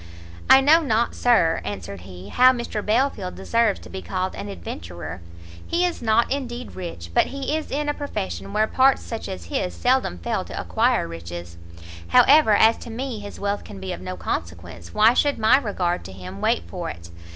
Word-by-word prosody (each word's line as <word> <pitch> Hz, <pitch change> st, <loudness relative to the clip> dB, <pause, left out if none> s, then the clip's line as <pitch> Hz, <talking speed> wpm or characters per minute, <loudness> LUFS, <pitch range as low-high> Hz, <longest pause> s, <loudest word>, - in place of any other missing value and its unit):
"I 265 Hz, -, +9 dB
know 310 Hz, +5 st, +6 dB
not, 235 Hz, -6 st, +1 dB
Sir," 220 Hz, -10 st, +3 dB
answered 100 Hz, -2 st, -6 dB
he, 90 Hz, +1 st, -11 dB
"how 255 Hz, -, +6 dB
Mr 235 Hz, -4 st, -4 dB
Belfield 215 Hz, -4 st, 0 dB
deserves 230 Hz, -3 st, +1 dB
to -, -, -12 dB
be 190 Hz, -, -6 dB
called 185 Hz, 0 st, -3 dB
an 205 Hz, -, -6 dB
adventurer: 85 Hz, -, -7 dB, 0.5 s
he 345 Hz, +1 st, +1 dB
is 355 Hz, -, -3 dB
not, 230 Hz, +1 st, +2 dB
indeed, 250 Hz, -3 st, -4 dB
rich; 165 Hz, -, -7 dB
but -, -, +4 dB
he 275 Hz, +2 st, -3 dB
is 315 Hz, -, -4 dB
in 295 Hz, +2 st, -2 dB
a 295 Hz, -, +1 dB
profession 95 Hz, -, -5 dB
where 215 Hz, -, +2 dB
parts 265 Hz, +4 st, +3 dB
such 225 Hz, -3 st, -6 dB
as 190 Hz, -, -6 dB
his 265 Hz, -11 st, -2 dB
seldom 255 Hz, -, +1 dB
fail 85 Hz, -, -2 dB
to -, -, -7 dB
acquire -, -, +1 dB
riches; 85 Hz, +1 st, -8 dB, 0.5 s
however, 270 Hz, -, +6 dB
as 225 Hz, +2 st, +5 dB
to -, -, -9 dB
me 240 Hz, 0 st, -4 dB
his 205 Hz, 0 st, -9 dB
wealth 200 Hz, 0 st, -2 dB
can 95 Hz, -, -10 dB
be 95 Hz, 0 st, -4 dB
of 85 Hz, -, -8 dB
no 90 Hz, 0 st, -6 dB
consequence, 85 Hz, 0 st, -5 dB
why 220 Hz, +2 st, +5 dB
should 285 Hz, +2 st, +2 dB
my 225 Hz, +4 st, +5 dB
regard 180 Hz, -8 st, -2 dB
to -, -, -8 dB
him 95 Hz, +1 st, -9 dB
wait 85 Hz, -, +1 dB
for -, -, -5 dB
it? 85 Hz, 0 st, -10 dB
205 Hz, 195 wpm, -23 LUFS, -, 0.5 s, I